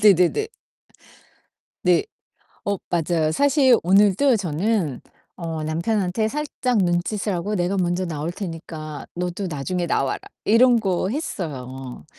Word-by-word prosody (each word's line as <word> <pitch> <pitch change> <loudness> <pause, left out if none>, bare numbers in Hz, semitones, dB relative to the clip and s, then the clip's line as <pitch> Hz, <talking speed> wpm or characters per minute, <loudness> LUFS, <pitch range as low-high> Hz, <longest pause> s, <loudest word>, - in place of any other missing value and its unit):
네네네. 200 - +4 1.4
네. - - +4 0.6
어 200 0 0
맞아요. 165 -2 +1
사실 275 - +4
오늘도 205 +8 +4
저는 175 - -1 0.3
어 165 -3 -4
남편한테 185 +6 0
살짝 265 -2 -1
눈짓을 190 +3 0
하고 185 +4 -2
'내가 180 +1 0
먼저 180 0 0
나올 160 -1 -3
테니까 160 -5 -7
너도 180 +2 -3
나중에 175 +3 -2
나와라.' 135 - 0 0.3
이런 240 +2 +5
거 190 -3 0
했어요. 135 - -5
180 Hz, 245 characters per minute, -23 LUFS, 165-215 Hz, 1.4 s, 이런